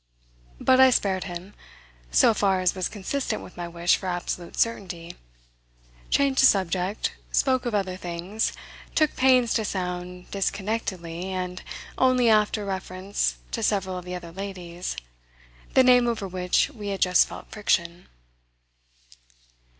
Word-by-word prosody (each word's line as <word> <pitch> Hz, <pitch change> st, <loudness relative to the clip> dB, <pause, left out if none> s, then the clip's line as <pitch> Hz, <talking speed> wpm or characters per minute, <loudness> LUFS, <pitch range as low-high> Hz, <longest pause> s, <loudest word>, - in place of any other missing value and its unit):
But 260 Hz, -, +4 dB
I 260 Hz, 0 st, +9 dB
spared 195 Hz, -6 st, +1 dB
him 180 Hz, +2 st, -7 dB, 0.6 s
so -, -, +5 dB
far 195 Hz, -3 st, +2 dB
as 185 Hz, -1 st, +2 dB
was 185 Hz, -1 st, -2 dB
consistent 230 Hz, +7 st, -3 dB
with -, -, -12 dB
my 175 Hz, -1 st, -5 dB
wish 170 Hz, +1 st, +2 dB
for 190 Hz, -, -6 dB
absolute 175 Hz, -1 st, -4 dB
certainty; 180 Hz, -7 st, -2 dB, 0.9 s
changed 275 Hz, -1 st, +3 dB
the 265 Hz, -, +9 dB
subject, 190 Hz, +1 st, 0 dB, 0.2 s
spoke 260 Hz, -2 st, +2 dB
of 230 Hz, -, -1 dB
other 190 Hz, -2 st, -1 dB
things, 180 Hz, +4 st, -2 dB, 0.4 s
took 310 Hz, -2 st, +2 dB
pains 255 Hz, -2 st, +4 dB
to 220 Hz, -, +1 dB
sound 180 Hz, -2 st, -4 dB
disconnectedly, 190 Hz, -4 st, -3 dB
and 185 Hz, -1 st, -4 dB, 0.4 s
only 255 Hz, -2 st, +4 dB
after 210 Hz, -1 st, +2 dB
reference 190 Hz, -, -2 dB, 0.2 s
to -, -, -2 dB
several 190 Hz, -2 st, 0 dB
of 180 Hz, -, -12 dB
the 180 Hz, 0 st, -5 dB
other 170 Hz, -2 st, -8 dB
ladies, 180 Hz, -, -6 dB, 0.8 s
the 260 Hz, -, +7 dB
name 250 Hz, -1 st, +6 dB
over 225 Hz, -4 st, -1 dB
which 180 Hz, +9 st, +1 dB
we 215 Hz, -7 st, -8 dB
had 195 Hz, -1 st, -2 dB
just 180 Hz, 0 st, +5 dB
felt -, -, -10 dB
friction. 175 Hz, -4 st, 0 dB
190 Hz, 140 wpm, -25 LUFS, 180-220 Hz, 0.9 s, I